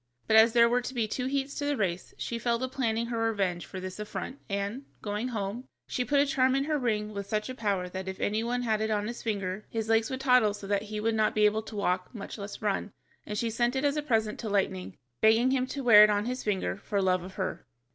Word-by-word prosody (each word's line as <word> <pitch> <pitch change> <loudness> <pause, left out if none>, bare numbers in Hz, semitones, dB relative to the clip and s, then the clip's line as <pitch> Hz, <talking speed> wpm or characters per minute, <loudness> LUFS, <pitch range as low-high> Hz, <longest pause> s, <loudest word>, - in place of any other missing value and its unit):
But 220 - +2
as 220 +1 +7
there 235 -1 +6
were 245 +1 +2
to 260 +2 -6
be 230 -3 +1
two 250 +4 -2
heats 275 +1 -1
to 285 - -2
the 290 -1 0
race, 185 -4 -2
she 235 - -3
fell 235 0 +1
to 260 +2 -2
planning 235 -3 -1
her 235 -1 -3
revenge 195 -6 0
for 190 - -7
this 185 +1 -7
affront, 210 +6 -5
and, 200 +6 -2 0.2
going 210 +3 -2
home, 225 +1 -4 0.2
she 250 - -1
put 280 +4 +2
a 285 - +5
charm 265 -3 +2
in 275 - +2
her 300 0 0
ring 215 -4 -1
with 200 -1 -5
such 215 +3 -2
a - - -3
power 200 -7 -1
that 190 +1 -6
if 190 0 -5
any 215 +2 0
one 245 +1 -1
had 220 -2 +1
it 220 - 0
on 210 -1 0
his 240 +1 -6
finger, 200 -2 -2
his 225 -1 -3
legs 225 0 +3
would 260 0 -4
toddle 250 -6 +4
so 205 - -9
that 200 0 +1
he 215 0 -5
would 225 +1 +1
not 215 -1 +1
be 210 0 +4
able 215 +1 +3
to 220 0 -10
walk, 185 +1 -1
much 210 +1 -7
less 200 +1 -6
to - - -9
run, 205 0 -1 0.3
and 210 - -3
she 230 +1 -1
sent 240 +3 +1
it 265 +2 0
as 285 0 +2
a 300 - 0
present 220 -6 0
to 220 - -4
Lightning, 95 - -1 0.2
begging 225 +4 +5
him 260 -1 +1
to 275 +1 -5
wear 215 -4 +9
it 210 - +6
on 205 0 +1
his 250 +1 -3
finger 195 -2 -1
for 200 0 -2
love 185 -2 +2
of 185 +2 -10
her. 190 -8 -4
220 Hz, 270 wpm, -29 LUFS, 205-245 Hz, 0.3 s, wear